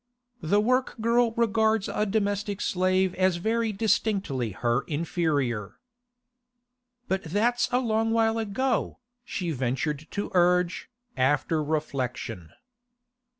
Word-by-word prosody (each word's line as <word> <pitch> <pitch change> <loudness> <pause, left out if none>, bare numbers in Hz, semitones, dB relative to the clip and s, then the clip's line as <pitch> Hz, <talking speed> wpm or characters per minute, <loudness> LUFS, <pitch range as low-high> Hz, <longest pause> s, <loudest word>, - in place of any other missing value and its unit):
The 185 +5 +2
work 255 +4 +1
girl 235 +1 +3
regards 220 -2 +2
a 210 - -1
domestic 205 -1 -1
slave 185 0 +1
as 185 -1 +2
very 225 +5 0
distinctly 200 - 0
her 120 +5 0
inferior. 145 - -1 1.3
'But 190 0 -1
that's 225 +8 +1
a 250 - +3
long 225 -3 +1
while 225 0 +2
ago,' 225 +3 -1 0.3
she 180 -7 -3
ventured 140 +3 -2
to 205 - -4
urge, 180 +2 +2 0.3
after 145 +4 +1
reflection. 130 - -3
190 Hz, 105 wpm, -26 LUFS, 150-220 Hz, 1.3 s, girl